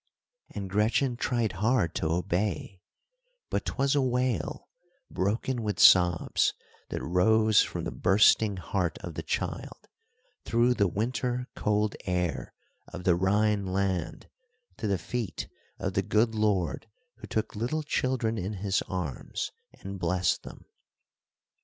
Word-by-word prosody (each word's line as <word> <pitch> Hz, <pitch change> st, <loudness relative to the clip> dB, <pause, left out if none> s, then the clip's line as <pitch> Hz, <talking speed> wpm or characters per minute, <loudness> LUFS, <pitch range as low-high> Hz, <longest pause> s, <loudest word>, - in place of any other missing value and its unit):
And 100 Hz, -1 st, -4 dB
Gretchen 110 Hz, +6 st, +1 dB
tried 120 Hz, -2 st, 0 dB
hard 110 Hz, -5 st, +1 dB
to 80 Hz, -, -1 dB
obey, 90 Hz, +2 st, -1 dB, 0.7 s
but -, -, -1 dB
'twas 135 Hz, 0 st, 0 dB
a 145 Hz, -, +3 dB
wail, 125 Hz, -7 st, -1 dB, 0.4 s
broken 115 Hz, +6 st, -1 dB
with 105 Hz, -2 st, -2 dB
sobs, 90 Hz, -2 st, +5 dB, 0.3 s
that -, -, -4 dB
rose 110 Hz, +5 st, +4 dB
from -, -, -3 dB
the -, -, -3 dB
bursting 100 Hz, +2 st, +4 dB
heart 90 Hz, -2 st, -2 dB
of -, -, -6 dB
the -, -, -4 dB
child, -, -, -4 dB, 0.6 s
through 120 Hz, +2 st, +3 dB
the 100 Hz, -5 st, +2 dB
winter 125 Hz, +6 st, -2 dB
cold 105 Hz, 0 st, 0 dB
air 90 Hz, -3 st, -2 dB, 0.3 s
of 90 Hz, -, -8 dB
the 90 Hz, -2 st, +4 dB
Rhine 100 Hz, +2 st, +2 dB
land, 95 Hz, -1 st, -2 dB, 0.5 s
to 110 Hz, -, -3 dB
the 100 Hz, -1 st, +1 dB
feet 95 Hz, -, -4 dB, 0.3 s
of -, -, -3 dB
the -, -, +2 dB
good 110 Hz, +1 st, +2 dB
Lord 105 Hz, -3 st, 0 dB, 0.3 s
who -, -, -10 dB
took 110 Hz, -, -2 dB
little 125 Hz, +9 st, -1 dB
children 125 Hz, -5 st, 0 dB
in 95 Hz, +4 st, -3 dB
his 100 Hz, 0 st, 0 dB
arms 90 Hz, -8 st, -4 dB, 0.3 s
and 95 Hz, 0 st, -6 dB
blessed 90 Hz, 0 st, +1 dB
them. -, -, -12 dB
105 Hz, 135 wpm, -28 LUFS, 90-115 Hz, 0.7 s, sobs